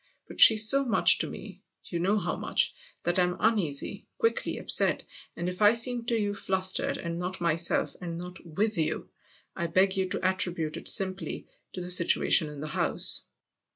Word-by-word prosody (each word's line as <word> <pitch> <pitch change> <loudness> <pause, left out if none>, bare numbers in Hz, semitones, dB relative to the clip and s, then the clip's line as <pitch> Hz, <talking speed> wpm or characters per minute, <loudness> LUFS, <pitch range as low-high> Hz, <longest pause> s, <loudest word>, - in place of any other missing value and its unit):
But - - -5
she's 220 -1 +8
so 275 +4 +4
much 235 -4 +3
to - - -2
me - - -11 0.2
you 170 - -6
know 195 +5 0
how 180 -3 -3
much - - -1 0.3
that 175 +2 0
I'm 180 0 0
uneasy, 195 -11 -1
quickly 455 - -2
upset; - - +2 0.3
and 175 - -5
if 180 +2 -6
I 210 +1 +5
seem 235 0 0
to 235 -1 -1
you 205 -1 -2
flustered 190 -1 -1
and 170 -1 -6
not 180 +1 -5
myself 170 0 0
and 170 -2 -6
THE 175 - -7
OTHER - - -8
HOUSE 180 - -11
45 - - -19
not 160 - -16
with 215 0 -1
you, 155 - -3 0.5
I 170 - -3
beg 190 +3 +1
you 190 -1 -2
to - - -4
attribute 175 -4 -2
it - - -2
simply 185 -4 0 0.3
to 185 - -6
the 180 0 -1
situation 170 -2 +3
in 145 -1 -10
the - - -5
house." 175 +2 +3
185 Hz, 200 wpm, -27 LUFS, 170-205 Hz, 0.5 s, she's